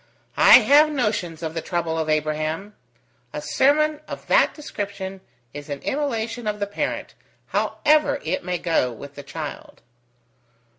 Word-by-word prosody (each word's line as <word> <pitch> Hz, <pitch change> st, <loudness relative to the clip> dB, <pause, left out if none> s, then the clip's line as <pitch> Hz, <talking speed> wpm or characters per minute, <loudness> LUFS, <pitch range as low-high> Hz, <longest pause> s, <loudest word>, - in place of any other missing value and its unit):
"I -, -, +9 dB
have 300 Hz, +2 st, +6 dB
notions 210 Hz, -, -2 dB
of 160 Hz, -1 st, -3 dB
the 165 Hz, -, -3 dB
trouble 170 Hz, -1 st, -2 dB
of 160 Hz, -1 st, -2 dB
Abraham. 155 Hz, +6 st, -1 dB, 0.6 s
A -, -, -3 dB
sermon 300 Hz, +2 st, +2 dB
of -, -, -8 dB
that -, -, +4 dB
description 200 Hz, -9 st, -6 dB, 0.3 s
is 145 Hz, +1 st, -9 dB
an 145 Hz, -, -3 dB
immolation 240 Hz, -5 st, -2 dB
of 210 Hz, 0 st, -2 dB
the 205 Hz, -, 0 dB
parent, 205 Hz, -, -4 dB, 0.4 s
however 305 Hz, 0 st, +2 dB
it 165 Hz, +4 st, -2 dB
may 180 Hz, 0 st, -2 dB
go 165 Hz, -8 st, +1 dB
with 140 Hz, +5 st, -10 dB
the 145 Hz, -, -9 dB
child." 140 Hz, -, -8 dB
195 Hz, 145 wpm, -23 LUFS, 160-265 Hz, 0.6 s, I